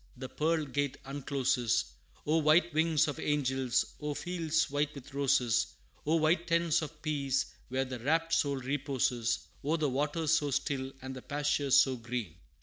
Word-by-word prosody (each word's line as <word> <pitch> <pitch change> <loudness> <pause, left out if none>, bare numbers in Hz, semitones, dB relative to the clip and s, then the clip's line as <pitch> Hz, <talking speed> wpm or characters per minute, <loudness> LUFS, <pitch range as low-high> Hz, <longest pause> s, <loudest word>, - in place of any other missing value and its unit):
the 130 +1 -6
pearl 155 +3 0
gate 145 -1 -2
uncloses! 130 - 0 0.3
O 155 +2 +2
white 160 +2 +4
wings 160 -1 +3
of 145 - -4
angels! 130 -4 +1
O 150 -1 -3
fields 165 -2 0
white 145 +1 0
with 140 0 -11
roses! 125 -4 +2 0.3
O 160 - +3
white 165 +2 +2
tents 170 -1 +2
of 155 0 -8
peace, 140 -3 -1
where 130 +1 -1
the 130 -1 -6
rapt 165 +6 +1
soul 145 -3 +2
reposes 130 -3 -1 0.2
O 155 +4 +1
the 155 -3 +1
waters 150 +4 0
so 155 -3 +3
still, 135 -1 -1
and 130 0 -6
the 130 - -7
pastures 145 -1 +1
so 130 -2 +5
green!" 120 -7 -4
145 Hz, 160 wpm, -31 LUFS, 130-155 Hz, 0.3 s, so